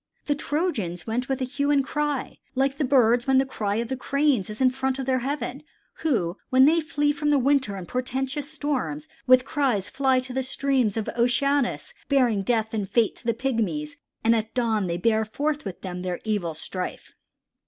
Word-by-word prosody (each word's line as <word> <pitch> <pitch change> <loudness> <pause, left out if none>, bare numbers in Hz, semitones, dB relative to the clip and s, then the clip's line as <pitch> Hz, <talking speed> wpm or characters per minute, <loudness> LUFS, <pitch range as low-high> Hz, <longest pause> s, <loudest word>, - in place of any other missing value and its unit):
"The 290 - +2
Trojans 285 - -2
went 245 +4 -2
with 270 0 -1
hue 280 +3 -1
and 285 -2 +4
cry 295 -1 -2 0.2
like 270 +1 +1
the - - +2
birds 245 -2 +3
when 265 -1 +4
the 265 - +4
cry 210 -6 -2
of 230 +1 -1
the 265 - -2
Cranes 275 -5 +1
is 215 - -7
in 260 -1 +5
the - - -8
front 265 0 -1
of 265 - -3
heaven, 260 +1 -2 0.4
who, 205 - 0
when 260 +1 +6
they 330 +3 +4
flee 295 -2 +1
from 295 0 -1
the 295 - +4
winter 265 -5 +2
and 185 -3 -7
portentous 265 +3 -2
storms, 260 - -3 0.2
with 255 0 +6
cries 265 -10 0
fly 265 -1 +2
to 255 0 -6
the 265 - 0
streams 260 -4 0
of 220 - -2
Oceanus 270 - +1 0.2
bearing 250 -7 +3
death 220 +1 0
and 205 -3 -2
fate 230 -3 +2
to - - -11
the 230 - +2
Pygmies, 270 +4 -1 0.3
and 230 +1 +4
at 220 +1 -3
dawn 220 -5 +1
they 170 0 -1
bear 220 +4 +2
forth 290 +7 -2
with 190 -3 -6
them 180 -1 -5
their 180 -1 -3
evil 200 -7 -1
strife." 180 +3 -6
255 Hz, 195 wpm, -25 LUFS, 220-280 Hz, 0.4 s, when